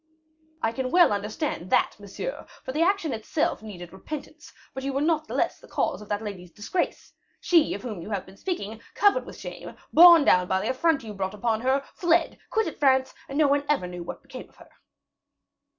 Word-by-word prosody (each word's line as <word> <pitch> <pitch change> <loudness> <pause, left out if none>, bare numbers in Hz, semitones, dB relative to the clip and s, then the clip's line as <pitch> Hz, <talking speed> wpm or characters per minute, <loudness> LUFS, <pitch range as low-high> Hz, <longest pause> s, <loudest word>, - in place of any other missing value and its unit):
"I 225 - +2
can 255 +2 -3
well 345 - +5
understand 205 - -3
that, - - +2
monsieur, 205 - -6 0.2
for 260 - -5
the 300 +4 -1
action 345 -5 +2
itself 225 +7 -1
needed 180 -5 -9
repentance; 305 +9 -8 0.2
but 265 - -6
you 275 0 -2
were 275 - 0
not 310 0 +1
the - - -6
less - - 0
the - - -16
cause - - -1
of 210 - -12
that 205 +1 -2
lady's 185 -4 -7
disgrace. 210 - -3 0.3
She, 335 -4 +3
of 200 - -8
whom 215 -8 -5
you 185 - -8
have 200 -3 -3
been 190 - -15
speaking, 225 - -5
covered 410 +4 +3
with - - -10
shame, - - -8 0.2
borne 340 -2 +9
down 180 0 +4
by 190 0 +1
the 220 +6 0
affront 300 +2 +1
you 215 -2 -7
brought 195 0 -3
upon 220 +1 0
her, 265 +2 +1
fled, 340 -1 +1
quitted 445 -8 -1
France, 265 -2 +3 0.2
and 275 - -4
no 305 -1 +5
one 280 0 +2
ever 290 -11 +2
knew 180 0 -7
what 170 - -8
became - - -10
of - - -27
her." - - -17
260 Hz, 210 wpm, -26 LUFS, 205-315 Hz, 0.3 s, borne